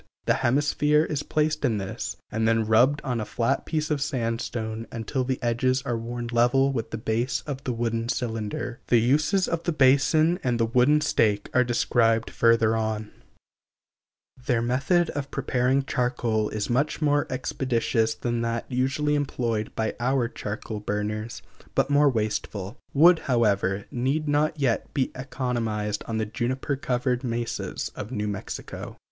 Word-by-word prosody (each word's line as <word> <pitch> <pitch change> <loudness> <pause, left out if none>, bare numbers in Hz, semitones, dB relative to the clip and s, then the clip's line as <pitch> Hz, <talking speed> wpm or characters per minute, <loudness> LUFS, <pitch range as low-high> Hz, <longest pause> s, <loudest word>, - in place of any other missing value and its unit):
The - - +4
hemisphere 145 +3 +3
is 150 -3 -2
placed 155 0 0
in 120 -6 +2
this, 95 -1 -5
and 110 +1 0
then 115 -1 +2
rubbed 125 +7 +4
on 125 -5 -1
a - - -1
flat 115 +2 -1
piece 155 -1 -1
of 145 -2 0
sandstone 115 -4 -2
until 125 +3 -2
the 130 0 -1
edges 130 +3 +1
are 125 -4 -1
worn 120 +1 -4
level 125 +3 +3
with 115 -3 -3
the 110 - -4
base 120 +3 -1
of 140 -2 -5
the 130 - 0
wooden 115 0 -2
cylinder. 115 -1 -3
The 120 - +4
uses 150 - +2
of 165 -1 -1
the 170 - -1
basin 155 +4 +4
and 120 -2 0
the 115 - +3
wooden 125 +6 +3
stake 105 -8 +1
are 125 - +5
described 115 -2 +1
further 115 -1 +3
on. 110 -1 -2 1.4
Their 120 -4 +2
method 140 +8 +2
of 140 -1 -4
preparing 130 0 0
charcoal 120 -4 0
is 105 -1 -3
much 135 +5 0
more 145 -1 +2
expeditious 120 -3 0
than 120 -1 -2
that 115 0 -2
usually 135 +4 +1
employed 120 -7 -1
by 110 -1 -1
our 125 0 +1
charcoal 110 -1 -5
burners, 105 +2 -3 0.3
but 140 - +2
more 145 0 +5
wasteful; 105 -3 -2 0.2
wood, 165 +4 +6
however, 100 -6 +1
need 135 +5 -1
not 150 +2 +1
yet 125 -5 0
be 135 -3 +1
economized 115 -5 -2
on 115 - -2
the 110 - 0
juniper 130 +5 -2
covered 125 -1 -1
mesas 120 -1 -3
of 105 - -6
New 105 -4 -2
Mexico. 100 -2 -6
120 Hz, 155 wpm, -26 LUFS, 115-140 Hz, 1.4 s, wood